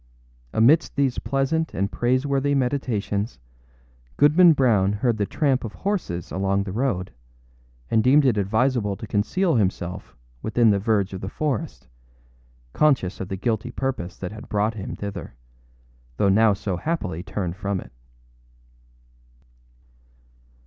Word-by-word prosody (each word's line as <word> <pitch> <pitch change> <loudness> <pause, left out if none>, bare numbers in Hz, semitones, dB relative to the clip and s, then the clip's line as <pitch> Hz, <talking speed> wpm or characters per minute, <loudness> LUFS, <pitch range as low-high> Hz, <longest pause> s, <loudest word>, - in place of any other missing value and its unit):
Amidst 140 +9 +3
these 135 -3 +1
pleasant 135 +6 -1
and 100 +1 -1
praiseworthy 135 - +1
meditations, 120 -5 -1 0.8
Goodman 160 +4 +6
Brown 110 -8 +3
heard 115 +2 0
the 100 -2 -1
tramp 135 -4 +1
of 110 - -6
horses 180 - -3
along 100 +1 0
the 100 - -6
road, 105 -5 -1 0.8
and 110 -1 +3
deemed 140 +4 +5
it 125 -5 +3
advisable 105 +1 +1
to 110 - -8
conceal 130 - +1
himself 90 -3 -2 0.3
within 115 0 +3
the 100 - +2
verge 100 -2 0
of 95 - -6
the 95 - -4
forest, 110 - -3 0.9
conscious 135 -12 +2
of 95 - -4
the 95 -1 -4
guilty 115 +3 -1
purpose 125 -8 -4
that 90 0 -5
had 110 0 -10
brought 105 +2 +1
him 100 -3 -6
thither, 100 -10 -7 0.8
though 100 - +3
now 110 +2 +5
so 95 -2 -3
happily 90 - -3
turned 95 -2 -4
from 100 -1 -2
it. - - -11
110 Hz, 135 wpm, -23 LUFS, 100-135 Hz, 0.9 s, Goodman